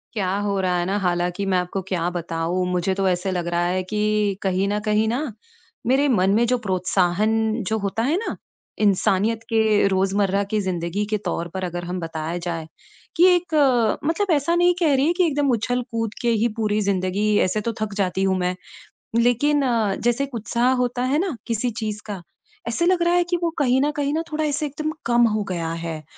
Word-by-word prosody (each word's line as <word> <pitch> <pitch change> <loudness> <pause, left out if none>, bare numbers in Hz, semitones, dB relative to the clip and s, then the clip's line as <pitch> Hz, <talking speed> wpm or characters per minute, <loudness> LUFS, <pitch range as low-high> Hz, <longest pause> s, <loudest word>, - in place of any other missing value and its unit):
क्या 195 -3 0 0.2
हो 200 -1 0
रहा 180 -1 +1
है 175 - 0
ना, 195 +3 0
हालाँकि 180 +1 -1
मैं 190 -1 +2
आपको 180 +2 -2
क्या 175 -2 -1
बताऊँ 170 +1 -2
मुझे 180 +1 0
तो 195 0 0
ऐसा 180 +2 -1
लग 175 -2 -2
रहा 175 0 0
है 185 +1 0
कि 210 -2 +1
कहीं 190 0 +1
न 205 +1 0
कहीं 215 +1 +2
न 265 +2 -2 0.6
मेरे 270 +3 +3
मन 195 -8 +3
में 235 +2 +3
जो 250 +1 +2
प्रोत्साहन 190 +2 +1 0.3
जो 220 - 0
होता 200 +2 -2
है 285 +7 +1
ना, 445 - -3 0.4
इंसानियत 210 +2 +2
के 220 -2 +3
रोज़मर्रा 195 +1 +1
की 215 - +1
ज़िंदगी 185 +1 -2
के 215 - +1
तौर 170 - -2
पर, 190 0 -4
अगर 175 -1 -4
हम 180 +1 -4
बताया 165 0 -4
जाए 170 -2 -4 0.5
कि 345 - +6
एक 350 -2 -3 0.5
मतलब 350 +5 0
ऐसा 290 +4 +1
नहीं 350 +1 +4
कह 320 -5 +3
रही 270 +1 +2
है 340 - +3
कि 360 0 +2
एकदम 290 -1 +1
उछल-कूद 230 -1 -1
के 240 - +1
ही 235 - +4
पूरी 215 -1 0
ज़िंदगी 200 +2 0
ऐसे 200 +3 0
तो 230 +2 -2
थक 215 -2 -2
जाती 190 -1 0
हूँ 190 -1 +2
मैं। 180 0 0 0.6
लेकिन 265 +5 +3
अ, 225 -6 +1
जैसे 240 +3 0
एक 275 -2 -6
उत्साह 235 +3 +1
होता 245 0 -2
है 270 +4 +1
ना, 360 -5 -1
किसी 230 +2 0
चीज़ 215 -1 -3
का, 205 -4 -6 0.5
ऐसे 235 +9 0
लग 360 0 +3
रहा 345 0 +2
है 355 - +4
कि 350 - +1
वो 340 - +2
कहीं 260 -1 +3
न 295 - +2
कहीं 285 0 0
न 320 - 0
थोड़ा 310 +1 -1
ऐसे 295 +1 -1
एकदम 305 +2 -3
कम 240 0 +4
हो 215 - 0
गया 165 -3 -2
है। 160 -2 -5
210 Hz, 210 wpm, -22 LUFS, 185-250 Hz, 0.6 s, कि